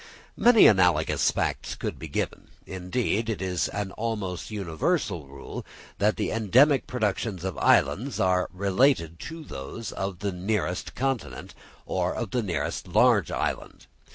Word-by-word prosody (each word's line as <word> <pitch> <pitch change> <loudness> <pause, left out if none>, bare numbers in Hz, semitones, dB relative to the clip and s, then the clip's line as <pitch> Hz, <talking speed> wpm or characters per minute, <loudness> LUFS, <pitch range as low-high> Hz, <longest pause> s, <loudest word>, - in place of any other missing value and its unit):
Many 235 -2 +6
analogous 90 -4 +4
facts - - -2
could - - -5
be 80 - -6
given: 70 - -3 0.2
indeed 105 +4 -2
it 110 - -2
is 90 -2 -1
an 100 -2 -4
almost 105 -6 -4
universal 100 - -1
rule 70 0 -8 0.4
that 105 0 +3
the - - -1
endemic 130 +6 +4
productions 105 -5 -2
of 95 -1 -3
islands 130 +6 +2
are 90 -1 +2
related 95 - +1
to 165 0 -7
those 100 - -7
of 95 -1 -4
the 100 +2 -2
nearest 90 0 -2
continent, 135 -2 -3 0.3
or - - -1
of - - -4
the 125 - +1
nearest 90 -6 -3
large - - +4
island. - - -3
100 Hz, 140 wpm, -26 LUFS, 90-115 Hz, 0.4 s, Many